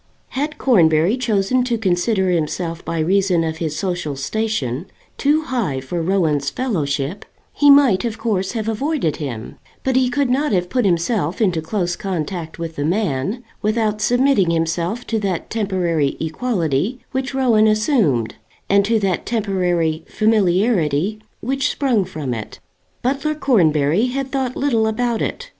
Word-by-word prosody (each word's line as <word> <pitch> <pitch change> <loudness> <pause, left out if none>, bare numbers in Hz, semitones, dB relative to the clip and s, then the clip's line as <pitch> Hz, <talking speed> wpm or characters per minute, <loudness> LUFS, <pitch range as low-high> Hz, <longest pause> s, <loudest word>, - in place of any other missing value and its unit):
Had 295 +3 -3
Cornbury 170 - +4
chosen 245 0 +1
to 240 -2 0
consider 190 -1 +1
himself 165 0 -2
by 170 - -3
reason 180 +1 +2
of 160 0 -3
his 160 -2 -3
social 175 -6 -2
station 145 - -2 0.3
too 300 +3 +2
high 235 - -2
for 165 +6 -4
Rowan's 160 -6 +1
fellowship, 150 - -2 0.3
he 290 - +4
might 275 -9 +6
of 230 -2 -3
course 195 -4 -1
have 220 -2 -3
avoided 225 - -1
him; 120 -7 -6 0.3
but 260 -1 0
he 255 -1 +3
could 270 0 0
not 280 0 +1
have 180 -1 0
put 250 -4 +1
himself 175 -1 0
into 185 -7 +1
close 175 +1 -2
contact 170 -3 -4
with 165 -1 -6
the 145 - -1
man, 180 - -1 0.2
without 215 -1 0
submitting 245 -4 +3
himself 170 +7 -1
to 225 - -1
that 195 -4 -3
temporary 180 -9 0
equality 170 - -1
which 265 0 -3
Rowan 235 -5 +4
assumed, 215 - +2 0.3
and 200 0 +4
to 225 +1 +2
that 195 -4 -1
temporary 180 -7 0
familiarity 200 -3 +1 0.2
which 270 +3 0
sprung 245 -9 +1
from 155 -8 -4
it. 110 -2 -7 0.4
Butler 280 +4 0
Cornbury 175 - +2
had 270 +1 -3
thought 260 -2 -1
little 235 -6 +1
about 235 +1 -1
it. - - -4
195 Hz, 150 wpm, -20 LUFS, 165-240 Hz, 0.4 s, might